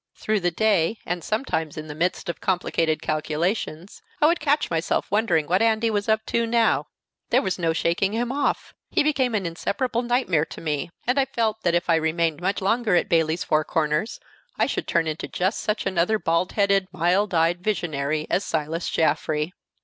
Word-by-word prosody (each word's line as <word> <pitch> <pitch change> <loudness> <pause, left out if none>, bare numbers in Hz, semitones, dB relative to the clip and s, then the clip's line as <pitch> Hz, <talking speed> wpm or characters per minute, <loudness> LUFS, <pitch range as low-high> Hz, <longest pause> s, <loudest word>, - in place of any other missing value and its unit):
Through 215 -1 0
the 175 -1 +1
day, 205 +1 +1
and 175 -1 -3
sometimes 160 - -2
in 155 - -5
the 150 - -7
midst 175 +5 -1
of 170 - -4
complicated 165 -3 0
calculations, 160 +3 -2 0.2
I - - +4
would 340 +3 +3
catch 295 - +1
myself 165 +1 0
wondering 195 -7 +2
what 180 +6 +1
Andy 225 0 +2
was 205 0 -1
up 220 0 +2
to 235 0 0
now! 230 0 +2 0.4
There - - +3
was 190 -2 -2
no 165 -2 +1
shaking 170 +4 +1
him 240 +2 -1
off; 285 +1 -1 0.2
he - - +2
became 265 -6 +1
an 200 -3 -1
inseparable 230 +8 -1
nightmare 240 - +1
to - - -10
me; 150 -2 -2 0.2
and 250 +3 +2
I 270 - +3
felt 225 -4 -1
that 170 -3 +1
if 175 - 0
I 165 -1 +4
remained 160 0 0
much 195 +3 -1
longer 220 -1 +2
at - - +1
Bayley's 165 0 +2
Four 155 0 +2
Corners 155 +7 -1 0.4
I - - +3
should - - -3
turn 165 -1 +2
into 155 0 -3
just 190 +4 -1
such 210 0 -2
another 185 +4 +1
bald 170 -2 0
headed, 200 -2 +2
mild 185 +3 +1
eyed 165 +2 +2
visionary 155 -7 -1
as 195 - 0
Silas 160 +1 -2
Jaffrey. 155 +1 0
180 Hz, 190 wpm, -24 LUFS, 160-220 Hz, 0.4 s, I